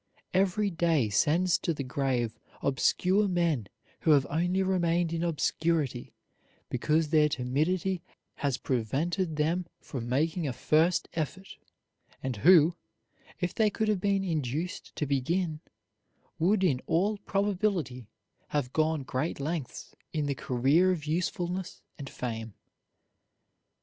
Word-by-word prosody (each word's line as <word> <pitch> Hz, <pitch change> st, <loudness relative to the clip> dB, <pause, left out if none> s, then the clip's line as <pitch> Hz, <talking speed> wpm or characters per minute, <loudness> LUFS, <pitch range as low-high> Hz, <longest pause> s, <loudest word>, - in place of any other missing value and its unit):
Every 195 Hz, +2 st, +2 dB
day 165 Hz, -8 st, +2 dB
sends 165 Hz, -, +2 dB
to 165 Hz, -, -1 dB
the 140 Hz, -, -3 dB
grave 125 Hz, -3 st, -1 dB, 0.2 s
obscure 185 Hz, +9 st, +2 dB
men 170 Hz, -, 0 dB, 0.3 s
who -, -, -1 dB
have 140 Hz, -3 st, +6 dB
only 175 Hz, +5 st, +1 dB
remained 175 Hz, -3 st, +1 dB
in 165 Hz, -, -1 dB
obscurity 160 Hz, -5 st, -1 dB, 0.6 s
because 155 Hz, +5 st, +1 dB
their 155 Hz, -1 st, +4 dB
timidity 160 Hz, +9 st, 0 dB, 0.4 s
has 140 Hz, -4 st, 0 dB
prevented 155 Hz, -, -1 dB
them 165 Hz, +4 st, 0 dB
from 120 Hz, -4 st, -6 dB
making 160 Hz, +5 st, 0 dB
a 130 Hz, -, -2 dB
first 165 Hz, +7 st, +2 dB
effort; 170 Hz, +4 st, -4 dB, 0.7 s
and 130 Hz, -4 st, -2 dB
who, 170 Hz, -, +6 dB, 0.6 s
if 180 Hz, -2 st, -1 dB
they 220 Hz, -1 st, +3 dB
could 220 Hz, +1 st, -1 dB
have 205 Hz, -4 st, +1 dB
been 200 Hz, -1 st, +1 dB
induced 160 Hz, 0 st, -3 dB
to 150 Hz, -, -1 dB
begin, 155 Hz, +4 st, 0 dB, 0.8 s
would 190 Hz, +4 st, +3 dB
in 135 Hz, -8 st, +2 dB
all 200 Hz, +5 st, +1 dB
probability 190 Hz, -, -1 dB, 0.4 s
have 140 Hz, -4 st, -2 dB
gone 155 Hz, -2 st, +1 dB
great 130 Hz, +5 st, -2 dB
lengths 150 Hz, -1 st, -4 dB, 0.2 s
in 155 Hz, -2 st, 0 dB
the 140 Hz, -, 0 dB
career 135 Hz, +9 st, +2 dB
of 160 Hz, -5 st, -3 dB
usefulness 180 Hz, +3 st, -2 dB, 0.2 s
and 140 Hz, -1 st, -6 dB
fame. 115 Hz, -3 st, -5 dB
160 Hz, 125 wpm, -29 LUFS, 140-180 Hz, 0.8 s, have